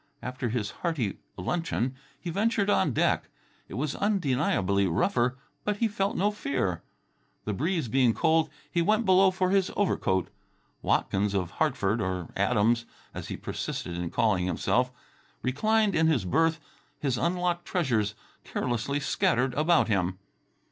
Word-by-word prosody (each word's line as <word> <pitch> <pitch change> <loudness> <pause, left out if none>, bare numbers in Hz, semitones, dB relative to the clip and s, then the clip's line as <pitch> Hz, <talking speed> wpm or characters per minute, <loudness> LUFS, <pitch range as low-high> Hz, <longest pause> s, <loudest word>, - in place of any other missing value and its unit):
After 125 -1 -3
his 110 -3 -2
hearty 145 - -1 0.2
luncheon 130 - -1 0.2
he 175 - -5
ventured 205 +1 +1
on 155 - +3
deck. - - +1 0.4
It - - -8
was 140 +3 -1
undeniably 130 - +1
rougher, 120 +8 +1 0.3
but 210 -1 -1
he 230 - +2
felt 200 -1 -1
no 205 +3 +2
fear. 135 - -2 0.6
The 105 - -1
breeze 160 - -1
being 120 0 +3
cold, 160 0 +3 0.2
he 170 - +2
went 215 +6 +2
below 190 0 +6
for 185 0 0
his 195 -1 +2
overcoat. 95 - +1 0.5
Watkins 100 +1 +1
of 90 -3 -1
Hartford 115 - 0
or 90 -3 -2
Adams, 115 +3 +2 0.3
as - - -6
he - - -5
persisted 85 - -4
in 85 -1 -3
calling 100 -5 +1
himself 125 +8 +1 0.5
reclined 215 +10 +2
in 160 0 +3
his 135 -12 +2
berth, 160 - +2 0.4
his 135 -4 0
unlocked 175 0 0
treasures 115 - 0 0.3
carelessly 125 +3 -2
scattered 130 -2 +1
about 155 +5 +3
him. 95 -3 0
135 Hz, 140 wpm, -28 LUFS, -, 0.6 s, below